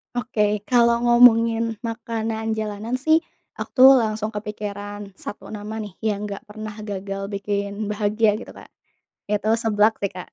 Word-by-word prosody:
Oke, 210 -4 0
kalau 235 -1 +4
ngomongin 230 -2 +4
makanan 225 -1 -3
jalanan 215 +2 -4
sih 315 +3 +5 0.4
aku - - -5
tuh 265 - +11
langsung 215 -1 -2
kepikiran 205 -1 -6
1 - - -8
nama 215 +1 -6
nih, 205 -3 -9
yang 210 -1 -1
nggak 200 - -7
pernah 215 0 -8
gagal 195 -1 -4
bikin 200 +1 -3
bahagia 210 0 +1
gitu 235 - -10
Kak, - - -14 0.6
itu 210 +1 0
seblak 215 -1 +3
sih, 200 - 0
Kak. 180 - -9
215 Hz, 145 wpm, -23 LUFS, 205-225 Hz, 0.6 s, tuh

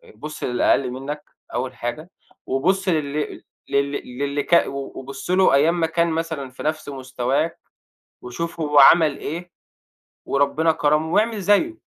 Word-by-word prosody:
بُص 150 +7 -8
للأقل 125 +1 +2
منك 145 +4 -6 0.3
أول 130 +1 -2
حاجة، 135 +9 -5 0.4
وبُص 185 +9 0
لل 150 -3 -2 0.3
لل 140 0 +1 0.3
للي 145 0 -1
ك 170 - +4
وبُص 135 +2 -6
له 185 -3 +4
أيام 160 +5 +3
ما 165 - +2
كان 170 +1 +1
مثلًا 160 -4 -3
في 125 - -10
نفس 155 -1 -2
مستواك، 135 +3 -2 0.6
وشوف 165 +7 -5
هو 150 -2 +3
عمل 155 +1 +7
إيه، 170 +4 -6 0.7
وربنا 150 +4 +2
كرمه، 155 +1 +1
واعمل 220 0 +2
زيه." 205 - +2
150 Hz, 135 wpm, -22 LUFS, 140-170 Hz, 0.7 s, عمل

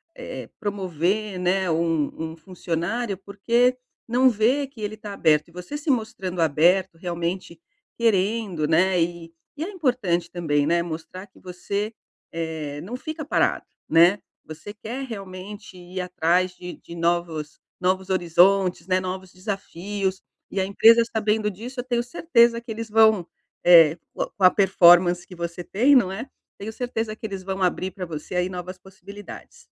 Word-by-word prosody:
eh, - - -7
promover, 195 0 -2
né, 185 +1 +1
um 160 -1 -1
um 160 - -10
funcionário, 185 +5 -3
porque 235 +6 +1 0.3
não 250 +3 +4
vê 250 +5 +1
que 260 -5 -14
ele 215 +1 -4
tá 210 -1 -8
aberto. 155 -5 +2
E - - -19
você 180 +11 -7
se 295 +1 -5
mostrando 220 -8 -1
aberto 165 +4 +3
realmente 170 0 -4 0.4
querendo, 205 -6 +1
né, 175 +3 +3
e 165 0 -3 0.2
e 305 - -3
é 355 - -4
importante 235 - 0
também, 150 -5 0
né, 170 +3 +2
mostrar 170 +3 -7
que 190 - -26
você, 200 +4 -4 0.4
eh, 160 -3 -4
não 205 +9 -6
fica 310 +4 -6
parado, - - +1 0.2
né, 170 +5 +5 0.3
você 160 +6 -9
quer 235 +5 -6
realmente 200 -2 -9
ir 180 +1 -8
atrás 180 0 +1
de 180 0 -8
de 170 - -12
novos 170 -3 -1 0.2
novos 185 +1 0
horizontes, 185 0 +3
né, 185 0 +2
novos 185 0 -5
desafios. 195 0 -4 0.3
E 195 - -2
a 190 - +1
empresa 225 +4 +6
sabendo 215 -1 +1
disso, 240 +7 -8
eu - - -2
tenho 240 -1 0
certeza 240 -4 +3
que 235 +1 -17
eles 225 0 -5
vão, 220 -4 +5 0.4
eh, 165 -3 +7 0.2
com - - -2
com 195 - -3
a 185 - +10
performance 175 -2 +5
que - - -13
você 170 +1 -5
tem, 250 +11 +3
não 200 -8 +4
é, 225 +7 -6 0.3
tenho 220 +2 -6
certeza 225 -3 -3
que 220 - -9
eles 195 -3 -5
vão 190 0 -3
abrir 185 +1 0
pra 185 -2 -6
você 160 +2 -7
aí 180 +1 +1
novas 180 0 -6
possibilidades. 195 +2 -12
190 Hz, 160 wpm, -24 LUFS, 175-220 Hz, 0.4 s, a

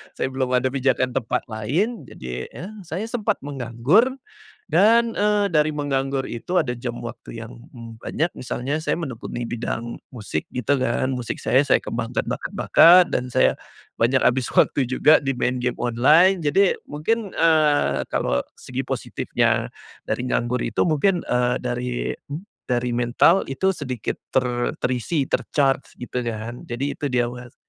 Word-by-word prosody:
Saya 130 - -2
belum 130 -1 0
ada 125 +1 +1
pijakan 130 -1 +1
tempat 125 -1 -1
lain, 145 - -1
jadi, 65 0 -6
ya, 190 +6 -9 0.2
saya 175 +5 -3
sempat 215 -3 0
menganggur 140 - +2 0.5
dan, 225 +7 +4
eee, 205 0 +2
dari 155 -4 +2
menganggur 135 -2 -1
itu 175 +10 -2
ada 125 -7 0
jam 120 0 -5
waktu 120 0 -9
yang 125 - -12 0.5
banyak. 165 +3 -1
Misalnya 135 +5 -3
saya 170 - -1
menekuni 120 -5 -5
bidang 120 0 -4
musik, 105 -10 -4
gitu, 125 +3 0
kan, 130 0 0
musik 125 -2 -4
saya, 130 +2 +3
saya 140 - +3
kembangkan - - -3
bakat-bakat 175 +1 +5
dan 125 0 -2
saya - - +3 0.4
banyak 125 +3 +2
habis 125 0 +1
waktu 130 -3 +2
juga 150 +4 +5
di 135 -2 -2
main 125 0 0
game 125 -1 -1
online. 155 +10 +4
Jadi 180 +7 +3 0.2
mungkin, 200 +8 -1
eee, 155 -3 +3
kalau 60 0 0 0.2
segi - - -4
positifnya - - -1 0.3
dari 125 - -3
nganggur 125 0 0
itu - - 0
mungkin, 175 +3 +2
eee, 125 0 +1
dari 125 0 -3 0.5
dari 125 0 0
mental 120 +10 +3
itu 190 +8 +1
sedikit 130 - -4
ter 125 -2 0
terisi, 130 +4 -1
ter-charge, 135 0 0
gitu, 125 0 -4
kan. 115 0 -5
Jadi 130 +4 -2
itu 145 - -3
dia 125 -2 +1
Mas. 120 0 -8
130 Hz, 145 wpm, -23 LUFS, 120-155 Hz, 0.5 s, bakat-bakat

